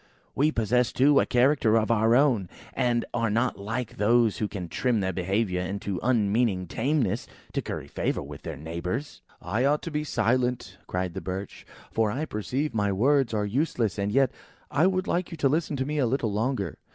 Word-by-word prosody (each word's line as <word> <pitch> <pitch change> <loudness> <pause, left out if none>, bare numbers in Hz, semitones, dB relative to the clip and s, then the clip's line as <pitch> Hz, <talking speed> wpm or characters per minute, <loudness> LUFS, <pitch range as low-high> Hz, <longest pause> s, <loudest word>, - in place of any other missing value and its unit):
We 150 +3 +2
possess, 120 0 +1
too, 140 +2 +4
a - - +1
character 125 -3 +3
of 110 0 +1
our 115 +1 +4
own, 125 -10 +3 0.2
and 120 -2 +1
are 115 -1 +1
not 120 +3 0
like 110 +4 -4
those 110 -2 +3
who 105 - 0
can 95 -4 -6
trim 120 - 0
their 95 -1 -1
behaviour 95 +1 0
into 95 0 -3
an 125 - 0
unmeaning 105 -3 +1
tameness, 120 - 0 0.3
to - - 0
curry - - -5
favour - - -2
with - - -9
their - - -6
neighbours." 85 - -4 0.2
"I 105 +8 0
ought 145 +2 +2
to 165 - -5
be 150 0 -1
silent," 120 -6 0
cried 90 -1 -2
the 95 - -5
Birch; 95 +1 -6 0.2
"for 110 -1 +1
I 135 +9 -2
perceive 130 +4 -2
my 105 -2 +1
words 135 +6 +2
are 105 -2 0
useless. 115 - 0
And 100 +1 0
yet, 135 +2 +3 0.4
I 160 +6 +4
would 185 0 0
like 175 -1 -1
you 165 - -7
to 145 - +2
listen 155 +2 0
to 130 -1 -1
me 150 +1 -2
a 130 - +3
little 115 -4 0
longer. 105 - -1
115 Hz, 200 wpm, -27 LUFS, 100-135 Hz, 0.4 s, too